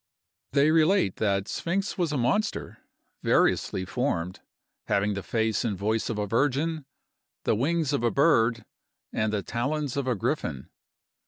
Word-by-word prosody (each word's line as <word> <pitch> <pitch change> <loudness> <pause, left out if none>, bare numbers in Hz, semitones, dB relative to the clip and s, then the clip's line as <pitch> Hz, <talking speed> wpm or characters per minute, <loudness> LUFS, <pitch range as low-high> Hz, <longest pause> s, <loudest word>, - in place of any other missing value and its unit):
They 145 +2 +4
relate 160 - +3
that 100 -1 0
Sphinx 195 +4 -2
was 175 -5 0
a 150 - 0
monster, 205 - -1 0.4
variously 95 - +2
formed, 90 -6 -2 0.5
having 105 +1 +1
the 100 - -3
face 110 0 0
and 105 -5 -1
voice 110 +3 -1
of 115 - -2
a 105 - 0
virgin, 145 +7 0 0.6
the - - +2
wings 150 +5 0
of 140 - 0
a 120 - +4
bird, 115 -6 +3 0.5
and 110 0 0
the 105 -2 -1
talons 140 +3 -2
of 140 -2 -1
a 125 - +1
griffin. 70 -8 -2
120 Hz, 150 wpm, -27 LUFS, 105-150 Hz, 0.6 s, They